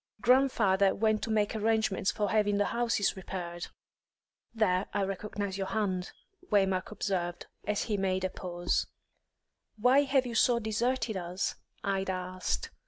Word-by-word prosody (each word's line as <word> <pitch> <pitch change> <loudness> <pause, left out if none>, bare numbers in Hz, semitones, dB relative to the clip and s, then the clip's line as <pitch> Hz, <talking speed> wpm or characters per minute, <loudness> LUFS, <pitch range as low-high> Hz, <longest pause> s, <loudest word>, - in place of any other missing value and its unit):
Grandfather 220 -6 +4
went 215 0 +2
to - - -3
make 215 -1 +1
arrangements 220 -3 +1
for 210 -2 -1
having 210 -2 +2
the 205 - +2
houses 230 -4 +1
repaired." 175 -2 -5 0.8
"There 200 -4 +1
I 200 - +2
recognise 195 0 -3
your 195 - -1
hand," 190 -4 -1 0.4
Waymark 195 -2 +2
observed, 180 -5 -2 0.2
as 210 0 0
she 215 -3 -1
made 190 -1 0
a 185 - -1
pause. 175 -1 -1 0.9
"Why 250 +6 +5
have 270 -2 +2
you 240 - -4
so 235 +1 +4
deserted 225 0 0
us?" 180 +1 -2 0.3
Ida 195 -1 0
asked. 185 0 -3
205 Hz, 140 wpm, -30 LUFS, 190-220 Hz, 0.9 s, Why